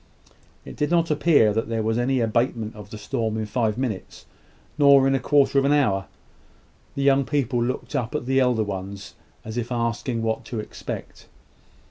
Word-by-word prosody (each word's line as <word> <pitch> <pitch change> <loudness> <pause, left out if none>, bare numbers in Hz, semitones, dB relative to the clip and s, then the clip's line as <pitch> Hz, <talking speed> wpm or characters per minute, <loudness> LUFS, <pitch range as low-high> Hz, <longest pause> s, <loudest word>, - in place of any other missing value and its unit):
It - - -9
did 150 0 -1
not 170 -1 +2
appear 145 -8 +4
that 115 +1 -2
there 115 -1 -1
was 110 +2 0
any 130 +1 +1
abatement 115 -1 -1
of 105 -1 -11
the 110 - -8
storm 110 +1 -2
in 110 - -2
five 110 0 -1
minutes, 120 -7 -5 0.5
nor 140 -2 +6
in 135 - +2
a 135 - +2
quarter 140 +1 +3
of - - +1
an 140 - +3
hour. 100 -10 +1 0.9
The 140 - -1
young 140 0 +4
people 130 -4 0
looked 130 +4 -4
up 125 +1 -2
at 150 - -2
the 135 +1 +2
elder 125 -4 +2
ones, 100 -1 -6 0.3
as 110 +2 -6
if 120 +1 -3
asking 115 0 -2
what 110 0 -1
to 115 - -5
expect. 105 - -8
120 Hz, 185 wpm, -24 LUFS, 110-135 Hz, 0.9 s, nor